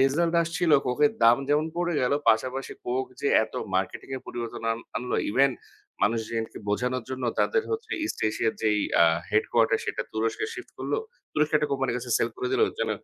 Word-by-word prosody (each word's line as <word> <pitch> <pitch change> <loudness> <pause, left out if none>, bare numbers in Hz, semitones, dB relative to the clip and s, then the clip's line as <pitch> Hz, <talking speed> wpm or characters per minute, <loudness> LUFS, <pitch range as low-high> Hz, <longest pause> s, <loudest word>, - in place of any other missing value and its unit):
Result 165 +6 +2
আসছিলো, 165 -1 +2
কোকের 145 +4 +3
দাম 115 +1 +7
যেমন 150 +2 +3
পড়ে 175 -1 0
গেলো, 130 +3 +2
পাশাপাশি 130 +4 -1
কোক 130 +2 0 0.2
যে 140 - +1 0.2
এত - - -15 0.2
মার্কেটিং 95 +6 -1
এ - - -4
পরিবর্তন 115 -1 -5
আন 115 - -4 0.2
আনল, 125 +1 -3 0.2
ইভেন 135 +5 +4 0.5
মানুষ 115 +3 +3
যেহেতু 115 -1 -4
বোঝানোর 125 +3 0
জন্য 130 -1 -3 0.2
তাদের 455 -2 +2
হচ্ছে 445 0 -3
ইস্ট - - -3
এশিয়ার 110 +1 0
যেই 105 -1 +3 0.2
আ - - +8 0.3
হেডকোয়ার্টার 115 +1 +2
সেটা 110 - -2
তুরস্কে 110 - -1
শিফট - - -9
করলো। - - -1 0.3
তুরস্কের 150 0 +2
একটা 150 - -1
কোম্পানির 135 -3 0
কাছে 125 0 -6
সেল - - +1
করে 380 0 -2
দিলো। 425 +3 +4 0.2
যেন - - 0
130 Hz, 185 wpm, -26 LUFS, 115-155 Hz, 0.5 s, আ